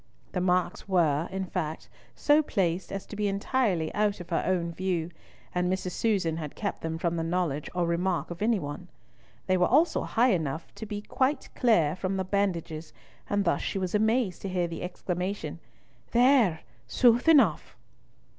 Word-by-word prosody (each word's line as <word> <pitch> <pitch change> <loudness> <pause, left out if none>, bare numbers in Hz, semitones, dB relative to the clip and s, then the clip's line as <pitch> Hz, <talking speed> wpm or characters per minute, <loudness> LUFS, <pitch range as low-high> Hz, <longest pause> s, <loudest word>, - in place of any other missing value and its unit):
The 180 - -1
marks 180 +1 0
were, 165 -4 +2
in 190 0 -2
fact, 160 -4 -4 0.3
so 295 +1 +4
placed 185 - -1
as 195 -1 -4
to - - -9
be 210 0 0
entirely 200 -4 0
out 205 -1 +1
of 175 - -10
her 165 - +2
own 175 -2 0
view, 175 -2 -2 0.4
and 180 0 +1
Mrs. 185 -1 -2
Susan 185 -7 0
had 150 -3 -6
kept 200 - -3
them 160 0 -3
from 170 0 -1
the 165 - -1
knowledge 165 -4 -1
or 175 -1 +1
remark 175 +1 -1
of 175 - -7
any 225 +1 +3
one. 145 +2 -6 0.6
They 185 0 +2
were 180 0 +3
also 310 +6 +3
high 240 +2 +2
enough 160 -3 -1
up - - -31
to 220 - -8
be 205 -1 -5
quite 265 +6 0
clear 175 -11 +3
from 190 +1 -2
the 190 - 0
bandages, 175 -5 -2 0.4
and 205 -1 +1
thus 170 - +1
she - - -3
was 185 -2 -2
amazed 220 -2 +1
to 195 - -4
hear 180 -2 0
the 165 - -6
exclamation, 180 -2 -4 0.5
"There! 240 - +4 0.3
sooth 245 +4 +4
enough." 250 - +4
185 Hz, 180 wpm, -28 LUFS, 170-210 Hz, 0.6 s, so